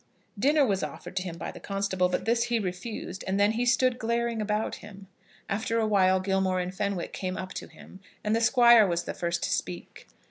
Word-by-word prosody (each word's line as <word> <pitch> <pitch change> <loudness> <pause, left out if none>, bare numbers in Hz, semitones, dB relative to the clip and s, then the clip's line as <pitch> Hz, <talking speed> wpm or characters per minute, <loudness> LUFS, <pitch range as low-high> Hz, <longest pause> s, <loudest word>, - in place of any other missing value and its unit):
Dinner 290 +5 +4
was 195 -5 0
offered - - -7
to - - +1
him 175 -2 -6
by - - -5
the - - -11
constable, 195 -2 -1
but 180 - -2
this 235 +1 +2
he 240 -1 0
refused, 190 0 -5
and 190 +1 0
then 205 +1 +4
he 240 +2 -1
stood 255 0 +2
glaring 235 0 -1
about 210 +1 -1
him. 200 -1 -12 0.4
After 220 +3 -1
a 225 - +2
while 190 -3 +3
Gilmore 190 -1 0
and 180 +1 -3
Fenwick 200 -2 -3
came 185 -1 -4
up 190 +1 -6
to - - -6
him, 190 - -15 0.2
and 215 +1 +1
the 230 - +1
Squire 235 -2 +6
was 170 -1 -1
the - - -5
first 170 0 -2
to - - -1
speak. 90 -1 -4
200 Hz, 215 wpm, -27 LUFS, 185-230 Hz, 0.4 s, Squire